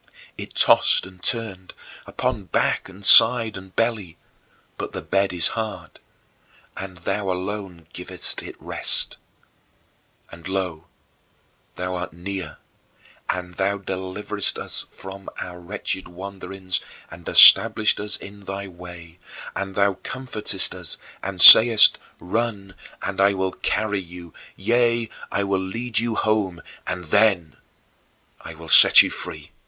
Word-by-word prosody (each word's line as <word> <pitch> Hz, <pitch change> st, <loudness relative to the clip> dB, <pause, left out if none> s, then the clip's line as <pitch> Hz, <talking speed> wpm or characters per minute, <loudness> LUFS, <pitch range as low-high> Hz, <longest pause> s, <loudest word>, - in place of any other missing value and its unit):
It -, -, -11 dB
tossed -, -, +3 dB
and 90 Hz, -1 st, -16 dB
turned, 105 Hz, -6 st, -4 dB, 0.3 s
upon -, -, -4 dB
back -, -, -2 dB
and 95 Hz, +1 st, -12 dB
side 115 Hz, +1 st, +8 dB
and 95 Hz, -1 st, -13 dB
belly 110 Hz, -7 st, -3 dB, 0.6 s
but -, -, -8 dB
the -, -, -6 dB
bed 95 Hz, 0 st, -1 dB
is 90 Hz, -2 st, -1 dB
hard, 110 Hz, -1 st, -8 dB, 0.8 s
and 95 Hz, -2 st, -9 dB
thou 95 Hz, +3 st, -4 dB
alone 95 Hz, -2 st, -6 dB
givest -, -, -2 dB
it -, -, -11 dB
rest. -, -, -3 dB, 1.1 s
And 85 Hz, 0 st, -12 dB
lo, 90 Hz, -4 st, -5 dB, 0.9 s
thou 90 Hz, 0 st, -5 dB
art 90 Hz, -3 st, -7 dB
near, 90 Hz, -1 st, -8 dB, 0.7 s
and 90 Hz, -1 st, -5 dB
thou 100 Hz, +1 st, -2 dB
deliverest 95 Hz, +1 st, -5 dB
us -, -, -4 dB
from 95 Hz, 0 st, -12 dB
our 90 Hz, -1 st, -9 dB
wretched 95 Hz, +1 st, -6 dB
wanderings 95 Hz, 0 st, -6 dB, 0.3 s
and -, -, -13 dB
establishest 110 Hz, -1 st, +6 dB
us 105 Hz, 0 st, -4 dB
in 100 Hz, 0 st, -14 dB
thy 100 Hz, +1 st, -7 dB
way, 90 Hz, -1 st, -14 dB, 0.4 s
and 95 Hz, 0 st, -6 dB
thou 100 Hz, -1 st, 0 dB
comfortest 130 Hz, -5 st, -3 dB
us -, -, -5 dB, 0.2 s
and 95 Hz, -1 st, -7 dB
sayest, 110 Hz, +3 st, +10 dB, 0.2 s
"Run, 100 Hz, -1 st, -5 dB, 0.3 s
I 100 Hz, +1 st, 0 dB
will 95 Hz, 0 st, -3 dB
carry 105 Hz, +1 st, -3 dB
you; 85 Hz, -2 st, -13 dB, 0.2 s
yea, 115 Hz, +2 st, -1 dB, 0.2 s
I 100 Hz, -, -2 dB
will 100 Hz, -1 st, -2 dB
lead 115 Hz, +4 st, -4 dB
you 115 Hz, -1 st, -3 dB
home 100 Hz, -6 st, -2 dB, 0.2 s
and 90 Hz, -1 st, -5 dB
then 90 Hz, -3 st, 0 dB, 0.9 s
I 85 Hz, -, -10 dB
will 80 Hz, +1 st, -13 dB
set -, -, +7 dB
you -, -, -5 dB
free." -, -, -10 dB
95 Hz, 130 wpm, -21 LUFS, 90-105 Hz, 1.1 s, sayest